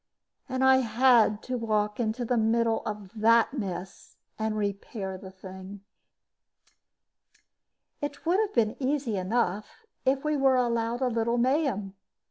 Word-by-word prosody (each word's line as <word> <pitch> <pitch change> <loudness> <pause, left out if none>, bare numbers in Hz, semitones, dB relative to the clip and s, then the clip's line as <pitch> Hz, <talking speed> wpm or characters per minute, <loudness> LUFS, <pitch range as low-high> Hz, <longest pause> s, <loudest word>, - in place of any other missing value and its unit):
And 260 0 -1
I 265 0 +6
had 235 -3 +3
to 255 -1 -3
walk 215 0 -1
into 235 +1 -1
the 245 - 0
middle 225 0 +2
of 210 -3 -6
that 230 +3 +4
mess 190 -5 -6 0.2
and 220 0 -1
repair 200 -1 -4
the 190 0 -10
thing. 190 +1 -10 2.2
It 290 +1 -5
would 355 +4 +3
have 430 -1 0
been 220 -2 +2
easy 265 -4 0
enough 205 - -2 0.2
if 270 +1 +1
we 305 0 0
were 270 -1 +4
allowed 235 -1 0
a 260 - +2
little 235 0 0
mayhem. 245 -6 0
230 Hz, 135 wpm, -27 LUFS, 210-260 Hz, 2.2 s, I